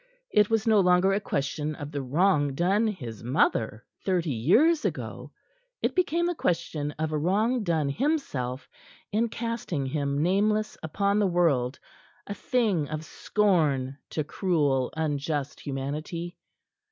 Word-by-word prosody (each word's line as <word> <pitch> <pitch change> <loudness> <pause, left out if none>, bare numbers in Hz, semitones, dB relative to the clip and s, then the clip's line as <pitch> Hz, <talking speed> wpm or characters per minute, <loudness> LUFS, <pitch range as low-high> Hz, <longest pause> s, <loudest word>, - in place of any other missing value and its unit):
It 210 -1 +4
was 225 -2 +1
no 220 -2 +5
longer 180 +1 +4
a 200 - +2
question 150 -4 -2
of 145 -1 -7
the 145 -2 -3
wrong 145 0 +2
done 195 +8 +2
his 120 - -5
mother 115 -4 +1 0.2
thirty 175 -5 0
years 245 - +4
ago; - - -4 0.5
it - - +1
became 345 -2 +1
the 350 - +1
question 165 - -1
of 155 0 -2
a 155 - 0
wrong 215 +10 +1
done 160 -6 +1
himself 140 - -2 0.4
in 225 +3 +1
casting 225 - -3
him 140 +1 -1
nameless 210 +4 +1
upon 200 +6 0
the 205 - +3
world, 150 -8 +1 0.5
a 200 - -4
thing 205 - 0
of 155 +1 -4
scorn 155 -12 +1
to 155 - -2
cruel, 145 -6 0
unjust 145 -2 -2
humanity. 150 +5 -4
165 Hz, 140 wpm, -27 LUFS, 140-205 Hz, 0.5 s, no